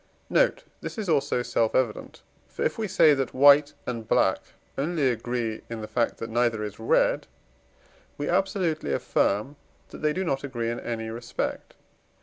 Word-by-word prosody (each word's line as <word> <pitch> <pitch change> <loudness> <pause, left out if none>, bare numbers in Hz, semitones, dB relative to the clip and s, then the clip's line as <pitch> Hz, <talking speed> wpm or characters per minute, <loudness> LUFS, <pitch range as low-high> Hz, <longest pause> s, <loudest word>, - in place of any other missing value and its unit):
Note. - - +3 0.2
This - - -6
is 215 -3 -3
also 140 -5 +1
self 115 -2 0
evident; 120 -4 -1 0.2
for, - - -5
if - - -1
we 220 - -1
say 160 -5 +5
that 135 -2 -2
white 145 +2 +6
and 115 -3 -4
black - - +3 0.4
only 145 -2 +1
agree 120 -2 -3
in 115 -1 -5
the 110 - -6
fact 120 0 0
that 115 0 -6
neither 115 -2 +1
is 105 0 -6
red, 110 - +2 0.9
we 145 - -3
absolutely 180 - 0
affirm 105 - 0 0.3
that - - -10
the 150 0 +2
do 185 +5 -2
not 135 -6 -1
agree 120 -4 -2
in 120 - -4
any 110 -1 -4
respect. 120 +2 -4
125 Hz, 165 wpm, -26 LUFS, 115-150 Hz, 0.9 s, white